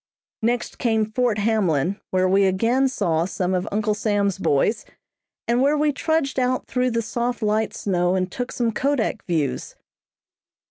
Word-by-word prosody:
Next 235 +1 -1
came 220 -2 +2
Fort 220 0 0
Hamlin, 200 -5 +1
where 185 0 +2
we 195 +1 +4
again 230 +8 +2
saw 170 -10 0
some 185 0 -2
of 180 0 -1
Uncle 210 +1 0
Sam's 205 -3 0
boys, 145 +11 +1 0.6
and 240 +2 +2
where 285 +3 +3
we 300 0 +2
trudged 290 -1 0
out 255 0 0
through 250 0 0
the 230 -1 -1
soft 235 +2 -2
light 215 +1 +1
snow 180 -2 0
and 185 -1 -1
took 245 +4 -4
some 235 -2 0
kodak 255 -3 -1
views. 155 -7 -2
215 Hz, 155 wpm, -23 LUFS, 190-245 Hz, 0.6 s, we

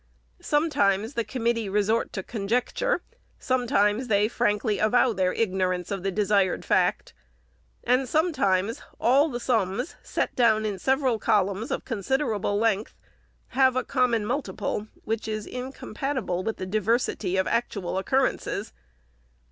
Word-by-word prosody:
Sometimes, 270 -8 +1
the 235 - 0
committee 230 -1 -1
resort 210 +3 +1
to 190 - -4
conject 230 - -2
ure; - - +1 0.3
sometimes 245 -2 +1
they 205 -1 +3
frankly 210 -2 0
avow 240 +3 +3
their 185 -2 +1
ignorance 185 -4 -1
of 195 -2 -2
the 195 - -1
desired 200 -1 +1
fact; - - +1 0.7
and 250 +1 +2
sometimes 230 - +1 0.2
all 275 +7 +4
the 240 -3 -4
sums, 235 - -1
set - - -2
down 220 -3 +3
in 200 -3 -3
several 265 -4 +1
columns 200 +2 +1
of - - -3
considerable 220 -2 -1
length, 215 -1 0 0.5
have 260 0 +3
a 255 - +1
common 245 -5 +1
multiple, 215 -4 -3 0.2
which 225 0 -3
is 215 -1 -3
incompatible 255 -5 -4
with 225 +2 -3
the 185 - -4
diversity 215 -1 0
of 190 - +2
actual 200 -7 -1
occurrences. 255 -2 -1
220 Hz, 130 wpm, -26 LUFS, 200-250 Hz, 0.7 s, all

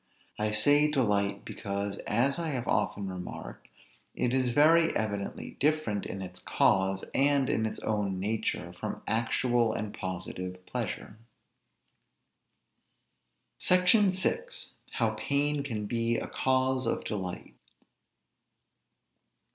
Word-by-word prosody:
I 105 0 +1
say 145 +8 +5
delight, 105 -8 +1
because, 100 0 -4
as 130 +8 +2
I 170 - -2
have 130 -5 -2
often 105 -2 0
remarked, 90 -1 -7 0.5
it 125 0 0
is 130 -1 +2
very 160 +6 +5
evidently 100 -2 -3
different 145 -9 +1
in 95 0 -5
its 90 -1 -7
cause, 95 0 +2
and 140 -1 +3
in 110 - +1
its - - -5
own 100 -3 -1
nature, 110 +3 -2
from - - -6
actual 115 0 +1
and 105 -1 -4
positive 90 0 -6
pleasure. 105 - -5 2.4
SECTION 185 +3 +5
VI. 190 - +1 0.5
HOW - - +2
PAIN 145 +1 +1
CAN 115 -7 -4
BE 115 +1 0
A - - -3
CAUSE 130 0 +1
OF - - -1
DELIGHT. 95 -4 -5
115 Hz, 115 wpm, -29 LUFS, 100-140 Hz, 2.4 s, say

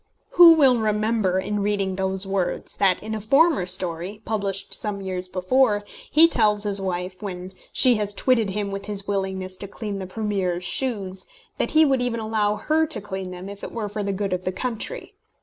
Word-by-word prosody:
Who 345 -2 +9
will 270 -6 +4
remember 215 -3 +1
in 210 +2 -2
reading 200 -2 0
those 190 0 -1
words 195 -2 -2
that, 190 -1 +2
in 220 +1 -5
a 215 - -3
former 275 - +3
story, 180 +3 -3
published 200 -2 -2
some 205 -2 -1
years 185 -1 -4
before, 205 +4 +1 0.3
he 320 +3 +7
tells 210 -8 +2
his 200 -1 +2
wife, 185 0 -4
when 185 -2 -6 0.2
she 250 -3 +5
has 205 -1 -2
twitted 230 -2 +2
him 200 +1 -3
with 195 0 -5
his 200 -1 -1
willingness 190 -2 -3
to 200 - -6
clean 200 0 -5
the 190 - -6
Premier's 190 -4 -2
shoes, 195 -3 -2 0.3
that - - 0
he 315 - +7
would 270 -3 +2
even 245 -2 -1
allow 215 -1 0
her 310 +9 +1
to 315 - -4
clean 190 -2 -6
them 180 +1 -8
if 200 0 -10
it - - -6
were 225 -3 -4
for 210 +1 -4
the 200 0 -1
good 195 -1 -2
of 185 0 -2
the 185 - -1
country? 250 - -5
205 Hz, 200 wpm, -23 LUFS, 190-220 Hz, 0.3 s, Who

